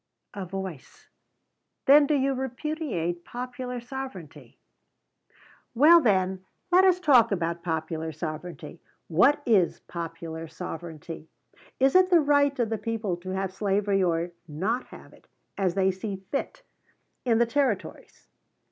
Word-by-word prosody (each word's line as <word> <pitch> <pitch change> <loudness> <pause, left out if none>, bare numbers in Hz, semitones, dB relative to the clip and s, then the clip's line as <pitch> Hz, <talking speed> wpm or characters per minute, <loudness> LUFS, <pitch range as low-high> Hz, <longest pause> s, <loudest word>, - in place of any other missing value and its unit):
[A 195 -2 -6
voice: 190 -6 -8 0.8
"Then 285 +1 +7
do 300 - +2
you 275 0 +1
repudiate 255 - -3
Popular 250 +1 -6
Sovereignty?"] 195 - -8 1.2
Well, 320 +7 +7
then, 190 -5 +1 0.3
let 365 +2 +6
us 365 -1 +4
talk 255 -10 +5
about 170 -3 -1
popular 160 -1 -3
sovereignty. 160 +2 -7 0.3
What 270 - +4
is 200 -7 +2
Popular 165 -1 -6
Sovereignty? 160 0 -8 0.5
Is 270 +1 +4
it 370 0 +5
the 350 -2 +6
right 285 -1 +3
of 235 -3 0
the 220 - -1
people 225 -5 -2
to 180 +2 -9
have 190 0 -2
slavery 200 0 +1
or 170 -1 0 0.2
not 195 +12 -2
have - - -14
it, - - -21 0.3
as 185 -3 0
they 190 -1 +3
see 195 +2 -5 0.2
fit, 285 - -3 0.6
in 235 -3 +2
the 235 - +4
Territories? 250 -4 -2
195 Hz, 130 wpm, -26 LUFS, 170-265 Hz, 1.2 s, Then